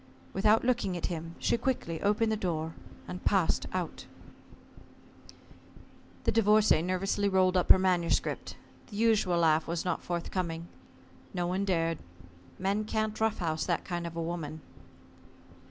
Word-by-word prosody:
Without 210 +3 +4
looking 230 -8 +1
at 170 - -3
him 165 +1 -6
she 235 - +1
quickly 225 -11 -2
opened 210 +2 +2
the - - +2
door 165 -5 -2 0.3
and 180 - -7
passed 190 -5 +2
out. 180 -3 -4 2.2
The - - +2
Divorcée 215 -6 +4
nervously 195 +3 0
rolled 185 -1 +3
up 180 - +1
her - - +10
manuscript. 180 -3 0 0.3
The 205 - -11
usual 215 -5 +3
laugh 160 -2 +3
was 170 +1 -2
not 180 - -1
forthcoming. 170 -1 -3 0.7
No 175 -1 0
one 185 +3 -1
dared. 165 -4 0 0.6
Men 200 +3 0
can't 215 0 -2
rough 220 -1 +2
house 160 -3 -1
that 170 -2 0
kind 175 -2 -3
of 170 - -8
a 165 - -2
woman. 160 -2 -4
185 Hz, 140 wpm, -30 LUFS, 170-205 Hz, 2.2 s, her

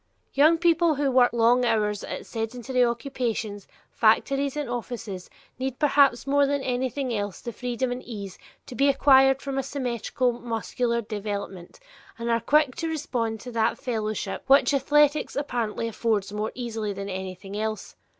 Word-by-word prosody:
Young 310 +4 +5
people 335 -1 +3
who 280 -1 0
work 250 -1 +5
long 235 +1 +3
hours 210 -3 +1
at - - -6
sedentary 245 +3 -1
occupations, 235 -4 -2 0.2
factories 275 0 +2
and 295 - -2
offices, 230 -6 -5 0.3
need 260 -1 -3
perhaps 280 -4 +3
more 280 0 +3
than 285 -1 -1
anything 255 0 -2
else 205 -2 -3
the 235 - -6
freedom 250 +2 -2
and 245 +1 -4
ease 200 -5 -8 0.3
to - - -9
be 275 +4 +3
acquired 270 -1 +5
from 275 -1 -2
a - - +2
symmetrical 255 -1 -1
muscular 235 +1 -2
development 205 - -6 0.4
and 235 0 -2
are 230 0 +2
quick 295 +2 +3
to 330 - -2
respond 240 -8 -2
to 250 - -8
that 225 -1 +1
fellowship 215 -5 -3
which 280 +1 +5
athletics 295 +2 +2
apparently 235 -6 -2
affords 215 -3 -1
more 210 +1 -2
easily 225 -4 -3
than 195 0 -6
anything 190 +1 -6
else. 215 0 -4
245 Hz, 155 wpm, -25 LUFS, 220-275 Hz, 0.4 s, Young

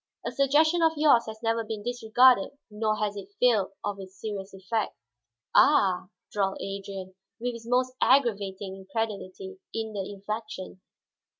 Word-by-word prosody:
A - - -1
suggestion 310 +5 +3
of 325 -1 +4
yours 285 -7 +5
has 220 +1 -8
never 225 0 +1
been 215 -1 -5
disregarded 245 +1 +4
nor 215 0 0
has 210 -1 -1
it 200 0 -9
failed 215 -6 +3
of 205 -1 -3
its 190 0 -11
serious 200 -3 -5
effect." 195 +3 -3 0.6
"Ah?" 195 -11 +4 0.2
drawled 195 -2 0
Adrian, 195 -1 -6 0.3
with 245 +1 -2
his 230 0 -10
most 255 +1 +2
aggravating 200 -7 +2
incredulity 215 - -5 0.2
in 220 -1 -3
the 195 -1 -4
inflection. 200 -2 -6
215 Hz, 140 wpm, -27 LUFS, 195-245 Hz, 0.6 s, yours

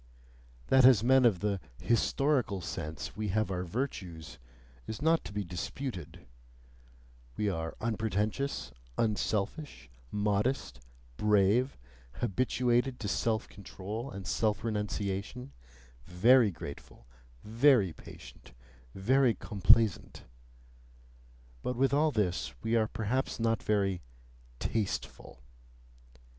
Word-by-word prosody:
That 130 -1 +6
as 125 -5 +7
men 130 +1 +5
of 100 -7 +3
the 100 -2 0 0.2
"historical 120 - +1
sense" 80 -2 -6
we 110 0 -3
have 105 +1 0
our 90 -1 -2
virtues, 85 - -5 0.5
is 110 - -5
not 160 +2 +2
to - - -7
be 105 0 -2
disputed: 90 - -6 1.1
we 105 - 0
are 80 -2 -4
unpretentious, 110 - -2 0.3
unselfish, 110 - -2 0.2
modest, 105 - 0 0.4
brave, 105 +5 +3 0.4
habituated 125 +3 0
to 105 - -3
self 110 +2 0
control 105 +5 -7
and 95 -6 -8
self 105 +5 0
renunciation, 105 +3 -3 0.5
very 115 +6 +5
grateful, 70 -7 -9 0.4
very 115 - +4
patient, - - -13 0.4
very 125 +4 +3
complaisant 105 0 +2 1.4
but 125 - -2
with 135 +2 +2
all 155 +2 +4
this 90 - -1
we 115 - +1
are 110 -1 +3
perhaps 115 +6 -2
not 115 -1 +1
very 100 -4 0 0.6
"tasteful." 100 - -4
105 Hz, 100 wpm, -31 LUFS, 95-125 Hz, 1.4 s, as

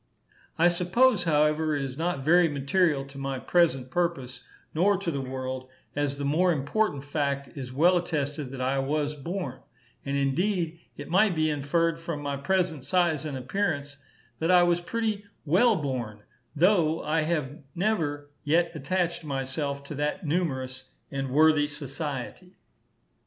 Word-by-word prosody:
I 170 +1 +5
suppose, 180 +5 +3
however, 150 0 +2
it 140 - -1
is 130 -2 -5
not 160 -3 -2
very 175 +1 +5
material 145 +1 +1
to 140 0 -11
my 135 -1 -2
present 135 -4 +2
purpose, 170 -6 -1 0.3
nor 195 +5 +3
to 180 -3 -2
the 140 -3 -2
world, 130 0 -5 0.3
as 145 -1 -1
the 140 - -3
more 170 +6 +3
important 145 +1 0
fact 140 -1 -2
is 130 -3 -6
well 170 +7 +4
attested, 150 -5 -2
that 130 0 -6
I 135 +2 +1
was 145 +2 0
born; 150 -2 -5 0.4
and, 140 0 -1
indeed, 165 +4 0 0.2
it 145 +2 -8
might 190 0 +4
be 155 -1 +2
inferred, 165 +3 0
from 165 -2 -4
my 145 -1 -3
present 160 0 0
size 170 -3 +1
and 145 -3 -3
appearance, 145 0 -2 0.4
that 165 - 0
I 180 -1 +7
was 175 0 +2
pretty 215 +1 -2 0.2
well 205 +10 +4
born, 120 - -4 0.3
though 165 -1 +3
I 155 +2 +1
have 155 -3 -2 0.2
never 160 -7 -1
yet 165 +3 +2
attached 170 +4 -1
myself 140 0 -3
to 140 - -7
that 150 +6 -2
numerous 130 -5 -2 0.3
and 135 -1 -3
worthy 150 +1 +4
society. 145 +4 -6
150 Hz, 150 wpm, -27 LUFS, 140-175 Hz, 0.4 s, I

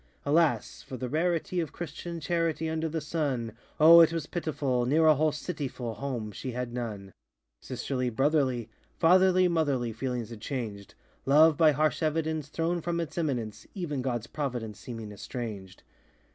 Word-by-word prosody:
Alas! 155 +2 +2
for 135 -2 -8
the 125 - -3
rarity 170 +4 0
Of 160 -5 -2
Christian 170 +1 -6
charity 165 0 -1
Under 160 0 -1
the 160 +1 -2
sun! 145 -7 -2 0.3
Oh! 165 +2 +9
it 165 - +6
was 165 -3 -2
pitiful! 140 -7 -1
Near 160 +5 +4
a 155 - +8
whole 155 +2 +2
city 150 -1 -4
full, 120 -3 -5
Home 115 -2 -4
she 125 +5 -6
had 125 -1 -4
none. 105 -5 -5 0.5
Sisterly, 125 -2 -2
brotherly, 135 -2 +1 0.3
Fatherly, 185 +2 +5
motherly, 140 -9 0
Feelings 120 -1 -3
had 110 -2 -9
changed: 110 -7 -5 0.3
Love, 155 +3 +6
by 155 +1 +5
harsh 150 -1 +1
evidence, 155 -1 -1
Thrown 165 +3 -1
from 170 +1 -2
its 165 -3 -4
eminence; 120 -10 -3
Even 155 -8 -3
GodŌĆÖs 120 -3 -3
providence 120 -8 -3
Seeming 115 -1 -7
estranged. 100 -3 -7
145 Hz, 160 wpm, -29 LUFS, 120-160 Hz, 0.5 s, Oh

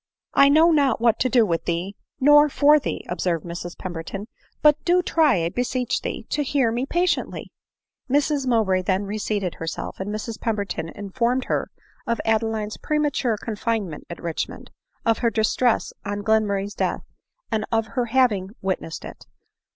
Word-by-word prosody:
" - - -67
I 275 - +6
know 320 +4 +6
not 280 -6 +3
what 230 -1 +3
to 255 - +2
do 240 -3 +4
with 170 -4 -1
thee 175 +4 -2 0.2
nor 295 +2 +6
for 295 +2 +5
thee," - - -4
observed 175 -2 -1
Mrs 175 +1 -6
Pemberton; 185 +3 -6 0.2
" - - -37
but 300 0 +5
do 360 +1 +3
try, 295 - +3
I 165 - 0
beseech 245 +3 -1
thee, - - -5
to 295 - +1
hear 270 -4 +1
me 245 +4 -2
patiently 350 +2 -1 0.3
!" - - -51
Mrs 285 0 +1
Mowbray 215 -6 +2
then 190 +2 0
reseated 205 -2 -2
herself; 165 -1 -5
and 190 +2 -4
Mrs 215 +1 -5
Pem 225 -2 0
berton 185 -5 -4
informed 235 +5 -1
her - - -1 0.4
of 235 -1 0
Adeline's 220 -1 0
premature 290 -6 0
confinement 215 -6 -3
at 170 - -7
Richmond; 170 -2 -5 0.3
of 225 -1 +2
her 235 - +2
distress 225 +2 +1
on 205 0 -4
Glenmurray's 205 -2 +1
death, - - -2 0.5
and 220 -1 0
of 225 -1 +2
her 250 -3 0
having 220 -5 +1
witnessed 185 -4 -3
it. - - -11
225 Hz, 170 wpm, -23 LUFS, 195-260 Hz, 0.5 s, I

